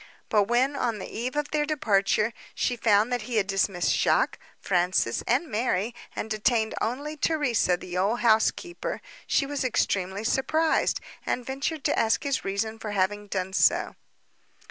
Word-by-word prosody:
But 210 -3 +3
when, 250 +6 +2
on 240 -5 -1
the 190 - -6
eve 250 +4 -4
of 295 0 -2
their 300 -1 +1
departure, 215 -6 +1 0.2
she 245 - 0
found 220 0 +3
that 245 - 0
he 240 +2 -5
had 210 -3 +3
dismissed 195 -2 +1
Jacques, - - +2 0.2
Francis, 180 - +1
and 265 +8 +2
Mary, 220 -2 -1 0.2
and - - -3
detained 220 +1 +1
only 280 +7 -2
Theresa 260 - +1
the 175 0 -8
old 210 +6 +1
housekeeper, 235 +10 +1 0.3
she 275 - +2
was 285 -1 -3
extremely 195 -5 0
surprised, 310 +7 +1 0.2
and 245 - -2
ventured 275 +3 -3
to - - +1
ask 225 +5 +2
his 280 -2 -1
reason 220 +3 -2
for 210 -2 -5
having 205 +2 0
done 190 -1 -3
so. - - +2
225 Hz, 160 wpm, -26 LUFS, 200-265 Hz, 0.3 s, But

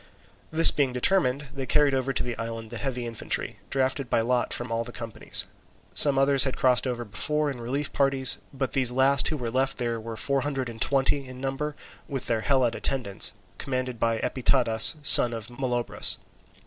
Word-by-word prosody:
This 160 +1 +7
being 135 -3 -1
determined, 140 -1 +1
they 135 -2 -6
carried 145 +1 +2
over 135 0 -1
to - - -2
the 120 -1 -5
island 115 -1 -7
the 120 - -6
heavy 125 -3 -4
infantry, 115 -2 -4
drafted 135 -1 -2
by - - +1
lot 120 +1 -1
from 120 0 -4
all 115 0 -2
the 120 - -10
companies. 115 -2 -4 0.5
Some 140 -2 +7
others 135 0 +4
had 130 - -2
crossed 130 0 +1
over 120 -1 -4
before 150 +8 -2
in 125 -3 -9
relief 140 +5 -4
parties, 135 -2 +1
but 135 -2 -4
these 130 -3 +3
last 135 +2 +2
who 155 - -2
were 120 -4 -5
left 135 +2 -1
there 120 -2 -3
were 110 0 -8
four 140 +2 -1
hundred 135 -3 -4
and 115 -1 -11
twenty 135 0 0
in 130 0 -11
number, 135 +3 -4 0.3
with 135 -4 -6
their 115 -1 -2
Helot 130 -2 0
attendants, 115 -7 -1 0.2
commanded 130 -3 -4
by 115 0 0
Epitadas, 125 0 +3
son 120 -4 +10
of 115 0 -8
Molobrus. 120 -1 -2
130 Hz, 185 wpm, -25 LUFS, 120-135 Hz, 0.5 s, son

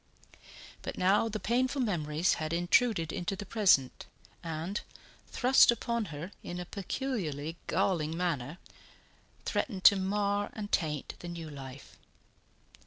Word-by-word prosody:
But - - -6
now 200 +5 +3
the 215 0 -3
painful 255 +5 +1
memories 170 - +1
had 155 +1 -2
intruded 175 0 +2
into 175 +3 -2
the 205 +1 -7
present, 190 - +2 0.4
and, 165 +5 -3 0.5
thrust 260 +1 +5
upon 235 -1 +1
her 160 +2 -7
in 175 - -6
a 180 - -4
peculiarly 180 - -3
galling 160 -3 0
manner, 165 -4 -2 0.9
threatened 195 -8 -2
to 200 - +9
mar 200 +1 0
and 210 -1 -6
taint 150 -4 -1
the 175 - -8
new 165 -2 -6
life. 135 -1 -10
180 Hz, 125 wpm, -31 LUFS, 160-210 Hz, 0.9 s, to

